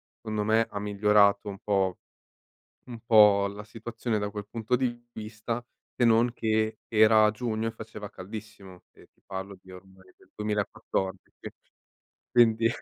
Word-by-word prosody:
secondo 110 -2 -3
me, 110 +2 +3
ha 100 - -6
migliorato 105 0 +3
un 100 - -8
po' 95 -3 0 0.9
un 120 -2 -9
po' 105 -3 +6
la 100 +1 -8
situazione 115 0 -4
da 105 0 -2
quel 105 0 -7
punto 115 +2 -1
di 120 -2 -3
vista, 110 +2 -5 0.3
se 120 - +3
non 115 +1 +4
che 110 -2 -1
era 110 -1 +5
giugno 110 -1 -3
e - - -2
faceva 110 -2 -9
caldissimo 100 -2 -10
e - - -20
ti - - -37
parlo 95 0 -7
di 95 - -19
ormai 95 0 -16
del - - -25
2014. 105 -2 -3 1.0
Quindi 115 -1 +4
110 Hz, 145 wpm, -27 LUFS, 100-115 Hz, 1.0 s, po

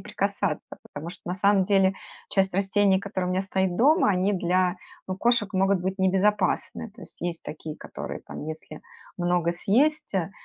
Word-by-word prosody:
прикасаться. - - -2
Потому 165 +3 -8
что, - - -11
на 180 - -1
самом 200 0 +3
деле, 195 -1 +3 0.3
часть 190 -2 +1
растений, 195 0 +3
которая 195 -2 -3
у - - 0
меня 190 +1 +1
стоит 190 -2 0
дома, 285 - +4
они 190 +2 +2
для, 180 0 +1 0.3
ну, 185 - -2
кошек 235 -1 +2
могут 195 0 +2
быть 190 +1 -2
небезопасны. 195 +2 +1
То 225 - -16
есть - - -9
есть 170 -1 -3
такие, 155 0 -7
которые - - -7
там, - - -7
если 155 -1 -7 0.4
много 175 -1 +1
съесть, 265 - +1
э, 190 0 0
190 Hz, 170 wpm, -26 LUFS, 180-200 Hz, 0.4 s, дома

